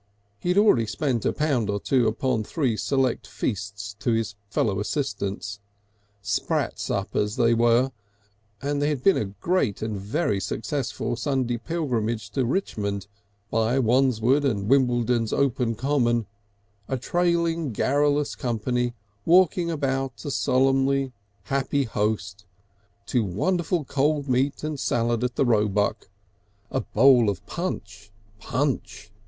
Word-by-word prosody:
He 175 - -3
had 180 - +2
already 165 - +5
spent 125 0 -1
a - - +3
pound 140 -8 0
or 100 0 0
two 125 +1 +2
upon 110 0 0
three 130 -1 -1
select 130 +1 0
feasts 105 -1 -4
to 115 +3 +1
his 110 -2 -1 0.2
fellow 100 -3 0
assistants, 105 -4 -3 0.6
sprat - - -1
suppers 105 +2 -1
they 120 -2 +3
were, 120 +3 +3 0.7
and 145 0 -1
there 145 - +2
had 140 -4 -2
been 195 - +5
a - - 0
great 105 - -1
and 110 -1 -2
very 100 - -1
successful 120 +5 -3
Sunday 130 -2 -1
pilgrimage 115 -9 -2
to 125 +3 0
Richmond, 100 - -2 0.5
by 115 +3 +1
Wandsworth 130 +1 +3
and 100 -8 0
Wimbledon's 120 -3 +2
open 125 -4 +1
common, 120 -3 +1 0.6
a 130 - -1
trailing 170 +1 0
garrulous 145 +5 +1
company 120 +1 -1 0.3
walking 175 - +4
about 135 -3 -2
a 145 - -2
solemnly 135 +1 +2 0.3
happy 140 +4 0
host, 105 -4 -2 0.6
to 120 -3 +1
wonderful 165 - 0
cold 145 +1 0
meat 130 +3 0
and 155 -2 -3
salad 120 -1 0
at 125 0 -1
the - - +2
Roebuck, 105 -2 +1 0.6
a - - 0
bowl 120 0 +5
of 95 -3 -4
punch, 100 - -5 0.3
punch! 120 -5 -2
125 Hz, 130 wpm, -25 LUFS, 110-140 Hz, 0.7 s, already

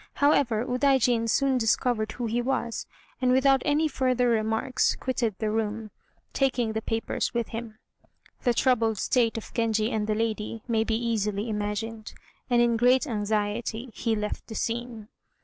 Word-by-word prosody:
However, 250 -6 +2
Udaijin 250 -3 +2
soon 270 +2 +2
discovered 225 -1 +1
who 245 - -4
he 230 +2 0
was, 240 -2 -2 0.3
and 250 -1 +3
without 265 +1 +4
any 305 +1 +2
further 255 -3 +1
remarks 225 +3 +1
quitted 240 -5 -2
the 215 -1 -1
room, 215 0 -2 0.4
taking 245 -5 +1
the 220 - -2
papers 225 +2 -2
with 235 -1 -1
him. 225 -1 -6 0.6
The 245 -2 +1
troubled 225 -4 +2
state 230 +1 +1
of 225 - -8
Genji 225 -1 +1
and 215 -1 -1
the 215 - +1
lady 220 0 -2
may 225 -2 +2
be 225 0 -1
easily 220 -2 -1
imagined, 215 +1 -4 0.3
and 240 -1 +4
in 235 -1 +2
great 250 +4 +4
anxiety 220 +1 -2
he 230 -2 -1
left 210 0 -4
the 220 - -8
scene. 230 -2 -3
230 Hz, 155 wpm, -27 LUFS, 220-250 Hz, 0.6 s, without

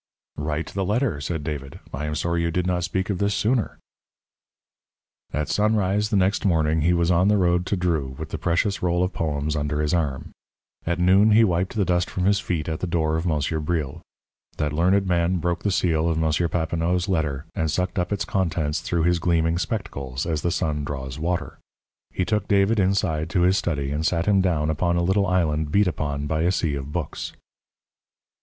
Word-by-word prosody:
"Write 75 +2 -3
the 95 - -1
letter," 105 - 0
said 80 +1 -3
David, 70 -3 -5
"I 75 +4 -3
am 75 - -2
sorry 85 +2 0
you 85 - 0
did 90 +2 -1
not 90 -1 0
speak 95 +2 -1
of 95 - -3
this 100 0 +1
sooner." 115 +1 0 1.5
At 75 -1 -2
sunrise 105 +1 +1
the - - 0
next 95 +2 +2
morning 80 -4 +2
he 85 +4 +3
was 85 0 +2
on 90 +2 +3
the 105 0 +4
road 90 -1 +2
to 100 - 0
Dreux 80 -7 -1
with 80 0 -6
the 80 - -5
precious 90 +5 0
roll 90 0 +1
of 90 - -2
poems 75 -1 -2
under 75 0 -1
his 75 +1 0
arm. 75 -7 -1 0.6
At 85 - +1
noon 95 +4 +5
he 115 +2 +6
wiped 90 -1 0
the 105 -3 +1
dust 90 -1 +1
from 90 - -2
his 100 +1 +3
feet 85 -7 -2
at 80 -1 -3
the 90 - -2
door 80 -2 0
of 80 +3 -1
Monsieur 80 0 0
Bril. 75 -3 -2 0.6
That 75 -1 -1
learned 95 +5 +3
man 90 0 +1
broke 85 0 -1
the 105 - 0
seal 85 -4 +1
of 80 - 0
M. 80 +1 +1
Papineau's 85 +2 0
letter, 75 -7 -1
and 80 - -1
sucked 90 +4 -1
up 90 +2 -2
its 100 - -1
contents 85 -5 -1
through 85 -2 -1
his 90 0 +2
gleaming 85 0 +1
spectacles 80 - -3
as 80 -3 -1
the 85 - 0
sun 75 -4 -1
draws 65 -1 -5
water. 85 +2 -2 0.5
He 90 - -2
took 105 +2 -1
David 100 +2 +3
inside 90 -5 +1
to 90 - +1
his 90 +2 +4
study 70 -4 -2
and 75 +2 -1
sat 85 +1 +1
him 100 -2 +4
down 80 -4 +1
upon 85 +3 0
a 85 - +1
little 95 +2 +2
island 80 -4 +1
beat 105 +4 +4
upon 75 -5 -2
by 80 +1 -1
a 85 +2 +2
sea 80 -5 0
of 70 0 -5
books. - - -4
85 Hz, 205 wpm, -24 LUFS, 75-95 Hz, 1.5 s, he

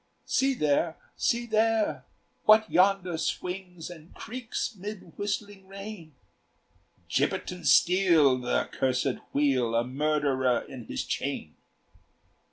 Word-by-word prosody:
"See 270 0 +2
there, 155 - +1 0.2
see 235 0 0
there! 220 - +1 0.4
What 215 0 +6
yonder 185 -2 +3
swings 180 0 -4
And 165 -1 -13
creaks 245 0 -4
'mid 200 -3 -8
whistling 205 -1 -4
rain?" 195 -6 -9 0.9
"Gibbet - - 0
and 180 -1 -5
steel, 170 -8 +5
th' - - -9 0.3
accursed 130 0 0
wheel, 130 -5 +1
A 115 - +3
murderer 135 -2 +1
in 125 -4 -9
his 65 - -4
chain. - - -3
175 Hz, 110 wpm, -28 LUFS, 140-205 Hz, 0.9 s, What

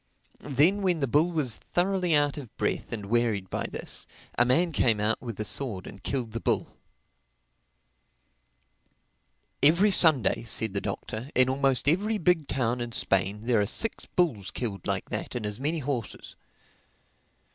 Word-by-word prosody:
Then, 150 +9 +2
when 185 -3 +2
the 140 - +1
bull 155 +8 +3
was 140 -9 0
thoroughly 180 -2 +1
out 145 -1 +2
of 135 -7 -9
breath - - -2
and 105 -3 -4
wearied 110 -3 0
by - - -2
this, - - -3 0.3
a 120 - +5
man 165 +8 +3
came 115 -7 +2
out 105 +2 0
with 115 -5 -7
a 105 - -2
sword 105 -7 -3
and 95 - -10
killed 125 -2 -2
the 115 - -4
bull. - - -1 2.9
"Every 170 +8 +5
Sunday," 145 - +3
said 110 -2 -1
the 100 - -1
Doctor, 110 +5 -5
"in 130 0 +5
almost 135 -1 +1
every 205 +8 +2
big 170 -5 +2
town 125 -2 -1
in 120 -1 -5
Spain 95 +1 0
there 115 -2 +2
are - - +2
six 225 - -2
bulls 125 - 0
killed 100 -7 -4
like - - -2
that - - -4
and 120 -3 -3
as 105 +1 -4
many 150 +5 -1
horses." 130 -7 -4
130 Hz, 160 wpm, -27 LUFS, 110-160 Hz, 2.9 s, a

